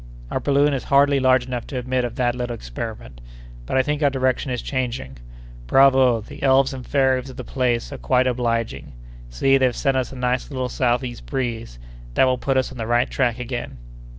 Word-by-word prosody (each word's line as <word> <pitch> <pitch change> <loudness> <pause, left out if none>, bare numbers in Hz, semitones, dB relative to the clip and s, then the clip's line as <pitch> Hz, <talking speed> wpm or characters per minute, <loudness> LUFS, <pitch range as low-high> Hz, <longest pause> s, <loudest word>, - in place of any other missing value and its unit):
"Our - - 0
balloon 145 +1 +2
is 135 - -3
hardly 140 0 +4
large 130 -1 +3
enough 125 -2 -5
to 135 - -5
admit 130 0 -1
of 120 -1 -4
that 120 -1 +1
little 120 -1 -4
experiment—but - - -7
I 130 - +4
think 150 +2 -2
our 145 - +4
direction 130 0 0
is 125 -2 -3
changing. 120 - -3 0.5
Bravo!—the 130 - +3
elves 135 0 +3
and 130 -1 -7
fairies 130 -2 +1
of 130 - -11
the - - -5
place 125 -3 -1
are - - -7
quite 130 0 +2
obliging. 120 - -2 0.4
See, 135 - +2
they've 130 -2 +2
sent 135 -2 +1
us 130 - -2
a - - -9
nice 125 0 -1
little 130 -3 -3
southeast 120 0 -1
breeze, 115 - -3 0.4
that - - +5
will 130 -1 +2
put 135 0 0
us 130 - 0
on 130 - -10
the 110 - -3
right 120 +2 +1
track 125 -3 0
again." 125 - -5
125 Hz, 195 wpm, -22 LUFS, 120-130 Hz, 0.5 s, that